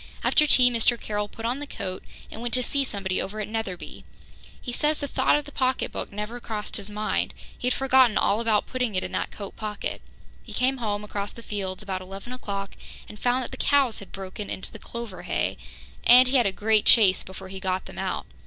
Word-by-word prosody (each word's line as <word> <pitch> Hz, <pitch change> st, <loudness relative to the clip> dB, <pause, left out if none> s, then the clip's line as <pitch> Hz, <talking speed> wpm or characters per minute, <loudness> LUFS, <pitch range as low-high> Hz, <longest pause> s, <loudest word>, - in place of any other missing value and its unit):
After 300 Hz, -, +4 dB
tea 250 Hz, -3 st, +6 dB
Mr. 235 Hz, 0 st, +3 dB
Carroll 210 Hz, -1 st, -2 dB
put 225 Hz, +2 st, -8 dB
on 245 Hz, +4 st, 0 dB
the 290 Hz, -, -5 dB
coat 185 Hz, -8 st, -5 dB, 0.3 s
and -, -, -7 dB
went 240 Hz, 0 st, +2 dB
to 250 Hz, -, +1 dB
see 280 Hz, +3 st, +1 dB
somebody 195 Hz, -7 st, -1 dB
over 210 Hz, +3 st, -5 dB
at 210 Hz, -, -2 dB
Netherby. 215 Hz, -5 st, -5 dB, 0.6 s
He 245 Hz, -, -5 dB
says 300 Hz, +4 st, +1 dB
the 285 Hz, -, -2 dB
thought 260 Hz, -1 st, +3 dB
of 295 Hz, -1 st, 0 dB
the 290 Hz, -, -10 dB
pocketbook 260 Hz, -1 st, -1 dB
never 210 Hz, +4 st, -5 dB
crossed 215 Hz, -3 st, -4 dB
his 205 Hz, -1 st, -3 dB
mind; 210 Hz, +1 st, -1 dB, 0.2 s
he 245 Hz, -, -3 dB
had 250 Hz, -, +3 dB
forgotten 260 Hz, -4 st, +4 dB
all 205 Hz, +3 st, +3 dB
about 220 Hz, -3 st, +2 dB
putting 250 Hz, -5 st, -2 dB
it 185 Hz, -, +1 dB
in -, -, -5 dB
that -, -, -1 dB
coat 200 Hz, -2 st, -8 dB
pocket. 210 Hz, -2 st, -4 dB, 0.4 s
He -, -, -11 dB
came 260 Hz, +2 st, +2 dB
home 210 Hz, -4 st, -2 dB
across 205 Hz, -1 st, -4 dB
the 235 Hz, -, -11 dB
fields 195 Hz, -2 st, -3 dB
about 190 Hz, -2 st, -3 dB
eleven 195 Hz, +6 st, -8 dB
o'clock 200 Hz, -5 st, -4 dB, 0.4 s
and 210 Hz, -, -11 dB
found 250 Hz, +1 st, +2 dB
that -, -, -7 dB
the 260 Hz, -, -7 dB
cows 275 Hz, -5 st, +3 dB
had 200 Hz, -, -12 dB
broken 195 Hz, +1 st, -6 dB
into -, -, -5 dB
the 220 Hz, -, -10 dB
clover 235 Hz, -6 st, -7 dB
hay, -, -, -1 dB, 0.5 s
and 250 Hz, +1 st, +8 dB
he 265 Hz, +2 st, +4 dB
had 240 Hz, -4 st, +4 dB
a -, -, +1 dB
great 215 Hz, +2 st, +2 dB
chase 195 Hz, -5 st, +7 dB
before 190 Hz, 0 st, -9 dB
he 190 Hz, 0 st, -7 dB
got 190 Hz, 0 st, -1 dB
them -, -, -9 dB
out. -, -, -2 dB
215 Hz, 225 wpm, -26 LUFS, 200-250 Hz, 0.6 s, and